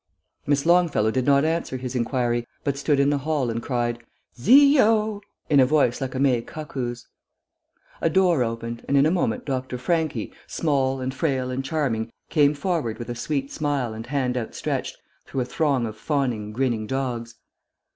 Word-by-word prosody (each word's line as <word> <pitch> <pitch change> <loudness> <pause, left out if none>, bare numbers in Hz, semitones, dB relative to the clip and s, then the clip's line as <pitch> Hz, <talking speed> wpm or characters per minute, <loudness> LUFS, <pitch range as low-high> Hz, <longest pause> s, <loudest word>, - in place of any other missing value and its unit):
Miss 140 -1 +2
Longfellow 170 -11 +3
did 130 +2 -1
not 140 +1 +4
answer 160 -4 -1
his 125 0 -5
inquiry, 120 -1 0 0.2
but 140 -2 0
stood 140 0 +1
in 140 +1 +3
the 145 - +1
hall 140 -4 -1
and 115 +1 -3
cried, 120 -2 -1 0.4
"Zio!" 220 - +5 0.3
in 145 -2 +4
a 130 - +7
voice 140 -4 +2
like 130 0 -3
a - - -2
May 130 -4 +3
cuckoo's. 125 -4 -6 1.0
A 165 - +2
door 175 -5 +3
opened, 115 0 -4
and 140 - +2
in 140 - +5
a 155 - +3
moment 170 -11 0
Dr. 130 -2 -3
Franchi, 155 -4 -1
small 135 -4 0
and 130 +1 -2
frail 130 -3 -1
and 130 +1 -2
charming, 130 -6 -1 0.2
came 145 -1 +4
forward 145 - -1
with 120 0 -7
a 120 - -3
sweet 140 +2 -2
smile 145 -7 -1
and 110 +2 -8
hand 130 -2 -1
outstretched, 115 -3 -3 0.3
through 135 - -2
a - - -1
throng 135 -2 0
of 110 -1 -5
fawning, 120 -5 -1
grinning 115 -2 -1
dogs. 120 -3 -3
135 Hz, 175 wpm, -24 LUFS, 120-150 Hz, 1.0 s, a